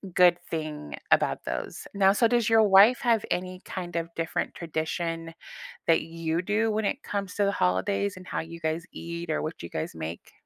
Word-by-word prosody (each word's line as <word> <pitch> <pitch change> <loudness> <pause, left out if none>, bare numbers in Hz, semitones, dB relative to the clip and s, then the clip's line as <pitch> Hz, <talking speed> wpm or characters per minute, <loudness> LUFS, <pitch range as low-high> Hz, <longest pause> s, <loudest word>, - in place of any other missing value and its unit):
good 180 -1 +6
thing 155 - -4 0.2
about - - +3
those. - - -4
Now, 195 -1 +5
so, 230 +3 +4
does 235 -1 +2
your 225 -1 +6
wife 205 +4 +7
have 230 -3 +3
any 185 0 -2
kind 175 -2 -6
of 165 0 -2
different 165 -1 -2
tradition 165 0 -3 0.5
that 165 - +5
you 165 0 -2
do 215 +4 +1
when 215 0 0
it 265 +8 -1
comes 200 -1 -3
to 205 - +2
the 200 - +2
holidays 185 - 0
and 185 - -11
how - - -2
you 165 +1 -7
guys 160 +1 -2
eat 170 0 -6
or 155 - 0
what 155 +1 -5
you 85 - -7
guys 80 - -4
make? 80 +1 -6
170 Hz, 195 wpm, -27 LUFS, 160-200 Hz, 0.5 s, wife